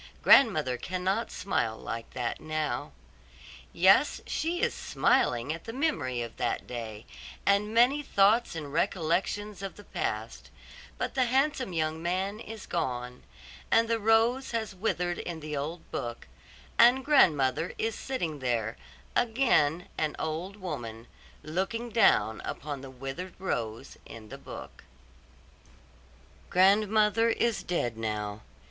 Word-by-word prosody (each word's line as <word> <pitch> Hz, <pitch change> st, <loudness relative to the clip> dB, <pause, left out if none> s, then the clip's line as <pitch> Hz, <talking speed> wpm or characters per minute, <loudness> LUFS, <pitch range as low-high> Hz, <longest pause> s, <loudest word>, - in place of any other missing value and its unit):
Grandmother 155 Hz, -, +5 dB
cannot 185 Hz, -, -1 dB
smile 115 Hz, -, -1 dB
like 115 Hz, 0 st, -6 dB
that 120 Hz, -2 st, -2 dB
now. 155 Hz, -1 st, -2 dB, 0.8 s
Yes, 190 Hz, +11 st, +4 dB
she 335 Hz, +2 st, -1 dB
is -, -, +1 dB
smiling 120 Hz, +5 st, +1 dB
at 165 Hz, -, -9 dB
the 225 Hz, -, -6 dB
memory 145 Hz, -, -1 dB
of 115 Hz, -, -9 dB
that -, -, -1 dB
day, 115 Hz, -3 st, -6 dB, 0.4 s
and 200 Hz, +1 st, +3 dB
many 245 Hz, +6 st, +4 dB
thoughts 220 Hz, -4 st, +3 dB
and 145 Hz, -3 st, -6 dB
recollections 195 Hz, +4 st, -1 dB
of 195 Hz, -1 st, -5 dB
the 205 Hz, -, -12 dB
past; -, -, -4 dB, 0.5 s
but -, -, -2 dB
the 260 Hz, -2 st, +2 dB
handsome 265 Hz, -2 st, +1 dB
young 160 Hz, -1 st, -1 dB
man 190 Hz, +4 st, -1 dB
is 225 Hz, -2 st, -8 dB
gone, 125 Hz, -6 st, -3 dB, 0.5 s
and 230 Hz, 0 st, +4 dB
the 230 Hz, 0 st, +1 dB
rose 225 Hz, +4 st, +3 dB
has 220 Hz, -3 st, -3 dB
withered 180 Hz, -3 st, -1 dB
in 170 Hz, -2 st, -5 dB
the 150 Hz, -1 st, -5 dB
old 155 Hz, +4 st, -4 dB
book, 120 Hz, -1 st, -5 dB, 0.5 s
and 250 Hz, +3 st, +6 dB
grandmother 160 Hz, -, +3 dB
is 225 Hz, 0 st, -1 dB
sitting 175 Hz, -, -3 dB
there, 120 Hz, -3 st, -1 dB, 0.4 s
again 220 Hz, -, +2 dB
an 155 Hz, -1 st, 0 dB
old 165 Hz, +5 st, -3 dB
woman, 120 Hz, -, -6 dB, 0.4 s
looking 190 Hz, +10 st, -2 dB
down 110 Hz, -, +3 dB
upon 145 Hz, -2 st, -5 dB
the 135 Hz, -, -9 dB
withered 135 Hz, +8 st, -7 dB
rose 115 Hz, -, -4 dB
in 110 Hz, -2 st, -11 dB
the -, -, -9 dB
book. -, -, -10 dB, 1.7 s
Grandmother 210 Hz, +4 st, +4 dB
is 230 Hz, -1 st, +1 dB
dead 120 Hz, -10 st, -2 dB
now. 105 Hz, -1 st, -3 dB
180 Hz, 130 wpm, -29 LUFS, 135-225 Hz, 1.7 s, and